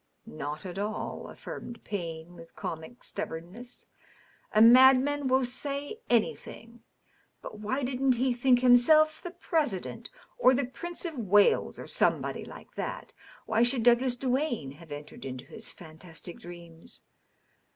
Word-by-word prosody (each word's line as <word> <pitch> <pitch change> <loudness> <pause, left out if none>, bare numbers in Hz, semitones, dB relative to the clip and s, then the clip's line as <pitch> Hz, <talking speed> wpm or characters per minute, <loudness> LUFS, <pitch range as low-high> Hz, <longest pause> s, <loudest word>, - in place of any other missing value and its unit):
"Not 145 - -6
at 185 +1 -6
all," 210 +1 -4
affirmed 235 -1 -9
Payne, 170 -4 -5
with 165 -1 -14
comic 165 +10 -7
stubbornness. 195 +10 -7 0.7
"A 215 - +3
mad 255 +3 +8
man 290 +1 -1
will 260 0 +3
say 280 - -4
anything. 230 0 -1 0.6
But 215 - -8
why 260 +7 -2
didn't 260 +1 +1
he 250 +1 +1
think 245 0 +3
himself 310 +6 +5
the 350 - -6
President, 315 - -2 0.3
or 260 - +6
the 275 +1 0
Prince 345 +8 -8
of 320 -6 -4
Wales, 205 -1 +3
or - - -8
somebody - - 0
like - - -12
tliat? - - -5 0.3
Why 220 +1 +1
should 240 0 +3
Douglas 245 +1 +4
Duane 250 - -1
have 155 +2 -15
entered 145 +1 -9
into 130 -1 -6
his 220 - -7
fantastic 170 0 -11
dreams? 170 -1 -11
240 Hz, 140 wpm, -29 LUFS, 175-260 Hz, 0.7 s, mad